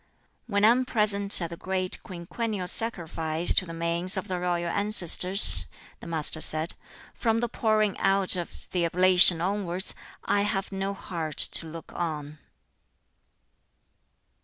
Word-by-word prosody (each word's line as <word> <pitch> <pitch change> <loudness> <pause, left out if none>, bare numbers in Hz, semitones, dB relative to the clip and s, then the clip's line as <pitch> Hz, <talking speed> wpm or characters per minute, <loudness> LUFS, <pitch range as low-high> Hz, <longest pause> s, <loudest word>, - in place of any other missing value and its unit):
"When 205 -2 0
I - - +6
am 250 +2 +1
present 210 -4 +4
at 170 - -7
the - - -7
great 185 0 -4
quinquennial 190 +3 -6
sacrifice 170 -6 +2
to 185 - 0
the - - -9
manes 170 +3 +1
of 190 - -5
the 185 -1 -5
royal 175 -1 -3
ancestors," 195 -1 +4 0.3
the - - -12
Master 160 -1 +1
said, 155 +2 +2 0.4
"from 225 -1 -2
the 240 - -2
pouring 215 -3 -1
out 195 -1 +2
of 175 -2 -8
the 180 -2 -2
oblation 180 0 +3
onwards, 190 -1 -3 0.3
I 205 - 0
have 200 -1 -3
no 195 +1 -5
heart 165 -5 -7
to 165 - +1
look 165 +1 -12
on." 155 -3 -6
185 Hz, 140 wpm, -25 LUFS, 170-200 Hz, 0.4 s, I